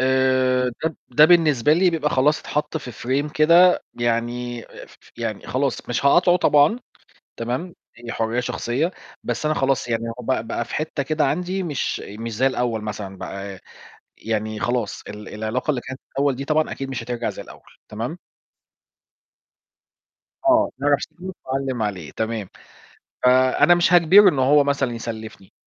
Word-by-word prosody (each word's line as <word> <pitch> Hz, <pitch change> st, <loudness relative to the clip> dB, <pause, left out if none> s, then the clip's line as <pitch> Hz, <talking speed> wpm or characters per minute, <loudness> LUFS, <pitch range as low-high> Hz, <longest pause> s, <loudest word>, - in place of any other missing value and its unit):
آآ 130 Hz, -1 st, +2 dB
ده 160 Hz, -, +2 dB
ب 160 Hz, -, -13 dB
ده 140 Hz, +5 st, +6 dB
بالنسبة 155 Hz, -6 st, +4 dB
لي 180 Hz, +3 st, +4 dB
بيبقى 155 Hz, -3 st, -1 dB
خلاص 150 Hz, +4 st, +2 dB
اتحط 150 Hz, +1 st, -3 dB
في 130 Hz, -5 st, -6 dB
frame 140 Hz, +6 st, -2 dB
كده 170 Hz, +4 st, +5 dB
يعني 120 Hz, 0 st, -2 dB
ف -, -, -14 dB
ف -, -, -22 dB
يعني 110 Hz, -3 st, -4 dB
خلاص 135 Hz, 0 st, -2 dB
مش 120 Hz, +3 st, -2 dB
هقاطعه 175 Hz, +5 st, +5 dB
طبعًا، 150 Hz, +5 st, +4 dB, 0.6 s
تمام، 125 Hz, +10 st, -4 dB, 0.2 s
هي 115 Hz, 0 st, -8 dB
حرية 115 Hz, +2 st, -1 dB
شخصية، 125 Hz, +6 st, -1 dB, 0.3 s
بس 120 Hz, +5 st, -3 dB
أنا 155 Hz, 0 st, +1 dB
خلاص 135 Hz, -2 st, 0 dB
يعني 115 Hz, -1 st, -1 dB, 0.2 s
هو -, -, -7 dB
بقى 125 Hz, -3 st, -1 dB
بقى 115 Hz, 0 st, -2 dB
في -, -, -6 dB
حتّة 155 Hz, -2 st, -2 dB
كده 155 Hz, +2 st, 0 dB
عندي 180 Hz, +4 st, -1 dB
مش 150 Hz, -6 st, -2 dB
مش 115 Hz, +3 st, -7 dB
زي 130 Hz, +5 st, +3 dB
الأول 120 Hz, -4 st, -1 dB
مثلًا 105 Hz, -2 st, -6 dB
بقى، 100 Hz, 0 st, -7 dB, 0.6 s
يعني 110 Hz, -1 st, -3 dB
خلاص 120 Hz, 0 st, -2 dB
ال 105 Hz, 0 st, -9 dB
العلاقة 110 Hz, +7 st, -2 dB
اللي 135 Hz, -4 st, -1 dB
كانت 130 Hz, +2 st, -8 dB
الأول 140 Hz, -1 st, +1 dB
دي 135 Hz, -, -5 dB
طبعًا 155 Hz, +2 st, +1 dB
أكيد 135 Hz, 0 st, -5 dB
مش 125 Hz, -3 st, -4 dB
هترجع 120 Hz, 0 st, -3 dB
زي -, -, -8 dB
الأول. -, -, -14 dB, 0.3 s
تمام؟ 115 Hz, +10 st, -5 dB, 2.3 s
آه. 320 Hz, -1 st, +4 dB
أعرف 145 Hz, 0 st, +3 dB
صاحبك 185 Hz, +4 st, -8 dB
وعلِّم 130 Hz, -2 st, -2 dB
عليه 95 Hz, -7 st, -4 dB
تمام. 110 Hz, -3 st, -3 dB, 0.8 s
فأنا 130 Hz, +6 st, +5 dB
مش 175 Hz, 0 st, +2 dB
هاجبره 180 Hz, +4 st, +7 dB
إن 145 Hz, -7 st, 0 dB
هو 140 Hz, +3 st, +4 dB
مثلًا 140 Hz, -3 st, 0 dB
يسلّفني، 110 Hz, -4 st, -8 dB
130 Hz, 160 wpm, -22 LUFS, 115-150 Hz, 2.3 s, هاجبره